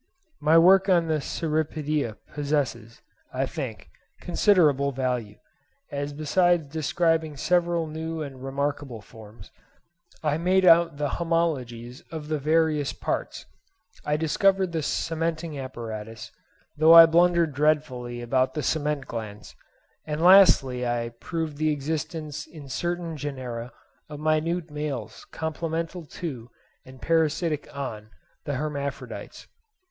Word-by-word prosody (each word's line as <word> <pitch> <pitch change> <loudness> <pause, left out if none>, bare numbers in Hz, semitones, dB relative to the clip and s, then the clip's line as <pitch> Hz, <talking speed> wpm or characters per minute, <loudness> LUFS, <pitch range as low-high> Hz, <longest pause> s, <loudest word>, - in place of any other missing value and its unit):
My 155 +2 +4
work 190 +3 +6
on 175 -3 +4
the 155 -2 0
Cirripedia 150 -5 -2 0.2
possesses, 140 -6 -2 0.3
I - - -1
think, - - -6 0.3
considerable 155 -7 +3
value, 125 -5 -3 0.5
as 145 0 -3
besides 160 +1 +1
describing 160 -1 0
several 175 +1 +1
new 160 +1 -5
and 135 -3 -9
remarkable 140 -3 -3
forms, 105 -1 -14 0.7
I 150 0 0
made 185 +2 +3
out 170 -3 +5
the 145 0 -1
homologies 130 -8 -2
of 155 -2 -7
the 155 -1 -1
various 155 -1 +1
parts—I 225 - -5
discovered 190 +4 +2
the 165 -1 -1
cementing 165 0 -2
apparatus, 115 -4 -7 0.4
though 160 +2 +7
I 165 0 +12
blundered 170 -1 +3
dreadfully 130 -5 0
about 130 +4 +1
the 150 - -2
cement 150 -1 -1
glands—and 110 +7 -9
lastly 165 -9 +6
I 120 -1 -1
proved 155 +5 -5
the 155 +1 +1
existence 150 0 -4
in 150 -4 -12
certain 170 +3 -3
genera 130 -4 -5 0.4
of 150 -1 -8
minute 155 +2 0
males 140 -7 -5
complemental 165 +1 -4
to 130 -8 -6 0.4
and 130 0 -13
parasitic 160 -1 0
on 110 -6 -5 0.4
the 145 - -2
hermaphrodites. 140 0 -5
150 Hz, 115 wpm, -25 LUFS, 135-165 Hz, 0.7 s, I